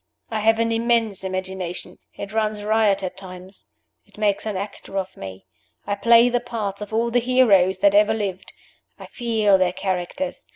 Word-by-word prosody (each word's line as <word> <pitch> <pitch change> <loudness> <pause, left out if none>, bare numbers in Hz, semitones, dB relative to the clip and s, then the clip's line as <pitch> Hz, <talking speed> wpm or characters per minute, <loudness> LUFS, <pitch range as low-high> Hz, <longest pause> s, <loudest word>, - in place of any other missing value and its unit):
I 220 - -1
have 225 +1 +3
an 230 0 0
immense 230 -3 +1
imagination. 185 -1 -5 0.2
It 200 +1 -7
runs 215 -1 -1
riot 210 -2 +2
at 185 - -5
times. 185 0 -10 0.4
It - - -23
makes 210 0 0
an 210 -3 -2
actor 195 0 -7
of 190 -1 -3
me. 95 0 -9 0.4
I 205 - -1
play 235 +3 +5
the 245 0 +1
parts 220 -5 -5
of 210 - -7
all 230 +2 0
the 245 - +3
heroes 230 -7 +3
that 300 - +6
ever 310 -6 +4
lived. 190 -3 -4 0.5
I - - -10
feel 220 -5 +1
their 180 -1 +1
characters. 185 +9 -4
210 Hz, 175 wpm, -22 LUFS, 190-230 Hz, 0.5 s, that